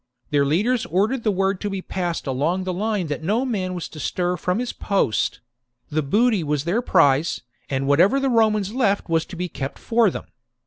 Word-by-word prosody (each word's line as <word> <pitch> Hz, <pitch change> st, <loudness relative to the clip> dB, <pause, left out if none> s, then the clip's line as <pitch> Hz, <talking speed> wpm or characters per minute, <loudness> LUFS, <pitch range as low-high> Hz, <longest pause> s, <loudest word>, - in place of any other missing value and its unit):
Their 145 Hz, -1 st, +3 dB
leaders 215 Hz, -, +1 dB
ordered 210 Hz, +9 st, +1 dB
the 220 Hz, -, +1 dB
word 195 Hz, -1 st, 0 dB
to 205 Hz, -, -2 dB
be 195 Hz, -2 st, -4 dB
passed 175 Hz, -3 st, -3 dB
along 150 Hz, +8 st, 0 dB
the 185 Hz, 0 st, -2 dB
line 205 Hz, 0 st, -1 dB
that 150 Hz, 0 st, -4 dB
no 215 Hz, +10 st, 0 dB
man 190 Hz, -7 st, -2 dB
was 175 Hz, -, -4 dB
to 155 Hz, -, -10 dB
stir 180 Hz, +4 st, -1 dB
from 180 Hz, +2 st, -1 dB
his 245 Hz, +1 st, -3 dB
post: 195 Hz, -, 0 dB, 0.5 s
the 155 Hz, +1 st, +1 dB
booty 210 Hz, -, +2 dB
was 150 Hz, -2 st, -1 dB
their 180 Hz, +9 st, 0 dB
prize, 160 Hz, -, +3 dB, 0.3 s
and 135 Hz, 0 st, -1 dB
whatever 175 Hz, -, +4 dB
the 270 Hz, -, 0 dB
Romans 215 Hz, -4 st, +2 dB
left 205 Hz, -8 st, +1 dB
was 165 Hz, -1 st, +1 dB
to 185 Hz, -, -9 dB
be 180 Hz, +1 st, -3 dB
kept 135 Hz, -4 st, -6 dB
for 230 Hz, -2 st, +2 dB
them. -, -, -6 dB
185 Hz, 200 wpm, -22 LUFS, 160-215 Hz, 0.5 s, whatever